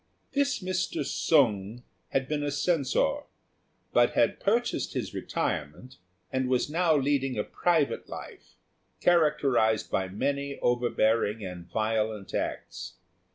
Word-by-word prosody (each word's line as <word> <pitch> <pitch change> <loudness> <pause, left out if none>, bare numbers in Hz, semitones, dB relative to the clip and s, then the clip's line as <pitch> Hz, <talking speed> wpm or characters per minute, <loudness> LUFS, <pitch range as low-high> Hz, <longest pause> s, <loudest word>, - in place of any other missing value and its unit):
This 280 -6 0
Mr. 185 -5 -1
Sung 115 - +2 0.3
had 135 -1 0
been 150 0 -1
a 145 - -1
Censor, 165 - +1 0.8
but - - +4
had - - +2
purchased 235 +4 0
his - - -3
retirement, 75 - -3 0.4
and 130 -1 0
was 130 +3 +1
now 165 -1 +3
leading 135 -2 +1
a 105 - +1
private 165 -5 0
life, - - -10 0.4
characterised 145 -10 +3
by 95 - 0
many 140 +8 -2
overbearing 115 -3 +1
and 90 -2 -8
violent 110 -2 -1
acts. - - -4
135 Hz, 115 wpm, -28 LUFS, 110-155 Hz, 0.8 s, but